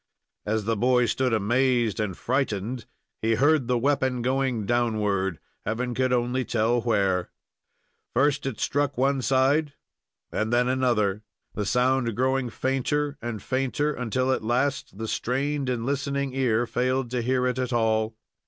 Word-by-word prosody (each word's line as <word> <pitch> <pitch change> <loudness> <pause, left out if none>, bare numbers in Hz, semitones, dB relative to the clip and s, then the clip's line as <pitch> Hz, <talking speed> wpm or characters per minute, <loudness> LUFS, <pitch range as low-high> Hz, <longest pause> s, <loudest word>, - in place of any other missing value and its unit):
As 110 0 0
the 115 +1 +1
boy 125 +3 +3
stood 125 +3 0
amazed 120 +1 +1
and 105 -5 -2
frightened, 120 -2 -2 0.3
he 115 0 +2
heard 145 +1 +3
the 125 -1 +2
weapon 130 -1 +1
going 130 -4 0
downward, 105 -6 0 0.3
Heaven 120 +4 -2
could 130 +1 0
only 125 +1 +1
tell 120 +1 +1
where. 100 -6 +1 0.9
First 140 +2 +2
it 125 -6 -4
struck 145 -1 0
one 135 +1 +2
side, 135 +4 +2 0.6
and 110 +1 -1
then 120 +1 +3
another, 120 -6 +1 0.3
the 105 -2 -3
sound 125 -2 +1
growing 130 0 +1
fainter 140 +3 -1
and 115 -4 -5
fainter, 135 +3 0
until 130 +1 -1
at 130 - 0
last 125 -1 -1
the 110 +1 -4
strained 135 +4 -1
and 120 -2 -2
listening 140 0 -1
ear 120 -3 +1
failed 125 +1 -1
to 125 -1 0
hear 125 +1 +1
it 125 0 0
at 130 -1 -2
all. 110 -1 +1
125 Hz, 150 wpm, -26 LUFS, 115-130 Hz, 0.9 s, boy